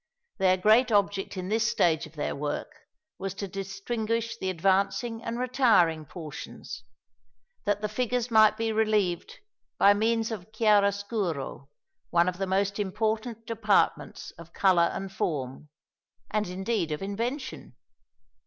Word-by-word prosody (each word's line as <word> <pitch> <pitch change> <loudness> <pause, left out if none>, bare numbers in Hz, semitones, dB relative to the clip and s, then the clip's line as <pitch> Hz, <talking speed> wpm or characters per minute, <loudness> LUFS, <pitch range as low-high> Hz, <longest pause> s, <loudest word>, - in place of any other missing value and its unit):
Their 185 -1 +4
great 220 +6 +4
object 200 -1 +1
in 185 0 -4
this 220 0 +2
stage 160 -1 +2
of 155 - -19
their 150 - -2
work 145 - -3 0.5
was 195 -1 -4
to 200 - -4
distinguish 215 +4 -3
the 190 -4 -3
advancing 195 +6 0
and 230 +1 -3
retiring 225 - +3
portions, 150 -7 -8 0.8
that 205 0 0
the 210 - 0
figures 245 +2 -1
might 215 -1 +6
be 225 0 0
relieved 215 - 0 0.4
by 200 - +6
means 225 +2 0
of 215 -1 -7
chiaro 210 -2 +4
scuro 190 - -4 0.4
one 170 +1 +3
of 180 0 -2
the 195 - -1
most 200 +2 0
important 220 +3 -2
departments 210 -9 0
of 170 0 -12
colour 180 -3 +4
and 195 0 -5
form, 140 -3 -3 0.6
and 210 -1 0
indeed 190 -1 -2
of 150 +4 -3
invention. 230 - -4
200 Hz, 135 wpm, -27 LUFS, 180-225 Hz, 0.8 s, might